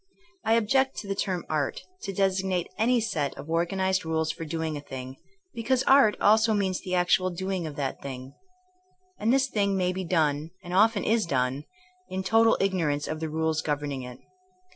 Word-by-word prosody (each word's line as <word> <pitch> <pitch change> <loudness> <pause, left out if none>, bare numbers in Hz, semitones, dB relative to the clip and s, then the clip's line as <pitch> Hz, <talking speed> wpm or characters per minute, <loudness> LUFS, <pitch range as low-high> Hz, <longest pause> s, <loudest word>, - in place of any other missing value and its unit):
I 220 - +2
object 260 +4 +2
to 205 - -6
the 195 - -1
term 190 -2 -2
art^' 150 -3 -1 0.2
to 200 - -4
designate 190 -2 0
any 240 +2 +2
set 160 -11 -2
of - - -8
organized 185 +2 +1
rules 160 -1 0
for 165 - -7
doing 160 0 -3
a 145 - -5
thing, 130 -1 -8 0.4
because 245 +2 0
''art" 270 -6 +5
also 220 +1 +4
means 190 -3 0
the 185 -2 -2
actual 180 +1 +3
doing 185 -1 -3
of 150 - -7
that 140 -2 -3
thing. 130 -1 -7 0.9
And 220 +2 +2
this 265 0 +4
thing 200 -5 0
may 180 -1 +1
be 190 +1 -3
done, 155 -3 0
and 175 - -7
often 210 +2 +4
is 220 -3 +1
done, 130 0 -1 0.4
in 190 0 -3
total 225 +3 +4
ignorance 165 -7 0
of 155 - -4
the 160 0 -3
rules 160 0 0
governing 145 -2 -2
it. 125 -1 -8
185 Hz, 185 wpm, -27 LUFS, 155-205 Hz, 0.9 s, art